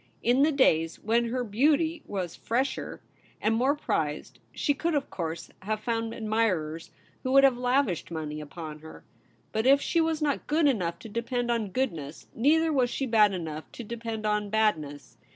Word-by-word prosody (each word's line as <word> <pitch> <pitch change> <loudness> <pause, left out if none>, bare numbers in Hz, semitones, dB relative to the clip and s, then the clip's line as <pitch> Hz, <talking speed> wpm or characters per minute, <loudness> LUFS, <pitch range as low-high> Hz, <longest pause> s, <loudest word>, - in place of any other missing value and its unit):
In 245 +3 +3
the 305 +2 +5
days 165 - +3
when 230 +2 +1
her 250 +2 -1
beauty 300 +9 +2
was 185 -4 -4
fresher 255 +4 -2 0.4
and 215 - +1
more 240 +4 +1
THE 280 - +4
REBEL - - -8
ROSE. - - -25
prized, 150 -1 -2
she 290 - 0
could 330 +3 -1
of 285 - -1
course 165 -2 -5
have 215 +2 -2
found 225 0 -2
admirers 200 -8 -1 0.3
who 255 - -2
would 275 0 +7
have 270 -2 +6
lavished 245 - 0
money 155 -2 -4
upon 155 +1 -8
her. 160 +1 -12 0.5
But 220 +3 0
if 275 +1 +7
she 335 +3 +1
was 320 -1 0
not 295 -3 -1
good 305 0 +3
enough 180 -11 0
to - - -4
depend 240 +2 -2
on 225 -4 -1
goodness, 165 - -3
neither 315 +6 +3
was 255 -3 +2
she 270 - -2
bad 215 -4 +5
enough 160 -4 -5
to 240 - -7
depend 225 -1 -5
on 210 -1 0
badness. 155 - -1
225 Hz, 190 wpm, -28 LUFS, 175-265 Hz, 0.5 s, would